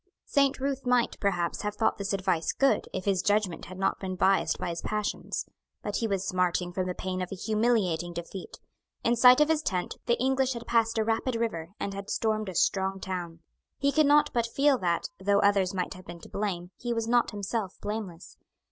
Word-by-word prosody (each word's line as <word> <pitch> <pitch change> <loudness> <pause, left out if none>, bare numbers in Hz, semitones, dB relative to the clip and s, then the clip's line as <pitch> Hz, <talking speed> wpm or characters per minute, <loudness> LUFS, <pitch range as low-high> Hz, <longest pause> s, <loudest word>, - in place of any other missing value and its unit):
Saint 280 -2 +2
Ruth 275 0 -2
might, 250 -1 +2
perhaps, 180 -4 0
have 210 0 -3
thought 220 0 +1
this 200 0 -2
advice 190 -4 0
good, 275 0 +2
if 185 - -4
his 195 -3 +2
judgment 205 -4 0
had 185 - -9
not 195 - 0
been 185 -1 -4
biassed 190 +1 +2
by - - -3
his 170 0 -4
passions. 210 -1 -2 0.4
But 205 - -2
he 230 - 0
was 195 -2 -1
smarting 180 -1 0
from 185 0 -1
the 180 - -3
pain 185 0 -3
of 180 - -4
a - - -3
humiliating 210 -5 +1
defeat. 170 +2 -7 0.4
In 235 - +3
sight 250 +2 +7
of 300 - +5
his 315 -1 +2
tent, 180 - -2
the 235 - +2
English 265 0 +2
had 235 -1 -7
passed 230 -1 +2
a 220 - +3
rapid 225 +3 0
river, 195 -6 -3
and 200 - -3
had 200 0 -7
stormed 215 -2 0
a 185 - -7
strong 190 +3 +1
town. 175 -3 -5 0.4
He 280 0 +2
could 305 0 +4
not 295 +1 +4
but 235 -1 +1
feel 275 +2 +3
that, 170 -2 0
though 200 +1 +2
others 200 -2 +3
might 185 -1 -2
have 185 0 -13
been 170 0 -8
to - - -12
blame, 185 -4 -3
he 240 -1 -2
was 230 -1 -1
not 240 0 +3
himself 205 -1 -3
blameless. 205 -5 -6
200 Hz, 210 wpm, -28 LUFS, 185-235 Hz, 0.4 s, sight